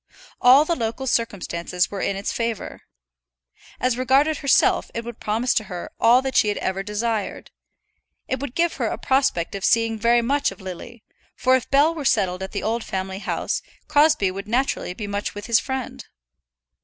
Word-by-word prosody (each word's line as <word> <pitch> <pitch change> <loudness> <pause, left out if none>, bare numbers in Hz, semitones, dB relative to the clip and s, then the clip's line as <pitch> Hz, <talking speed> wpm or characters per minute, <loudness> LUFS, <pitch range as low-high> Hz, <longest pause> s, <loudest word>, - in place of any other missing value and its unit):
All 265 +4 +7
the 340 - 0
local 230 +1 -3
circumstances 180 -7 -1
were 200 - -4
in 200 - -1
its 195 +1 -3
favour. 230 -3 -3 1.0
As 255 -1 0
regarded 275 +4 +3
herself 275 -2 +3
it 230 0 -4
would 235 -1 -8
promise 225 +4 0
to 215 - 0
her 180 -3 -7
all 245 +3 +5
that 265 -1 -3
she - - +4
had 205 - 0
ever 190 +1 -2
desired. 210 +1 -3 0.8
It 260 - -2
would 270 -2 -6
give 340 0 +2
her - - 0
a - - -3
prospect 265 -11 +1
of 200 -1 -5
seeing 225 -1 +2
very 235 +1 +3
much 280 +4 +1
of 195 - -12
Lily; 195 +5 -9 0.3
for 255 +1 +3
if 260 - -2
Bell 290 +4 +4
were 315 -3 -5
settled 190 -8 +1
at 190 - -5
the 200 - -4
old 225 +1 -1
family 190 0 -4
house, - - -2 0.3
Crosbie 300 -9 +3
would 195 +2 -7
naturally 240 -5 -1
be 210 - -5
much 205 0 -4
with 205 - -7
his 235 -1 +4
friend. 265 -2 -5
230 Hz, 185 wpm, -23 LUFS, 200-260 Hz, 1.0 s, All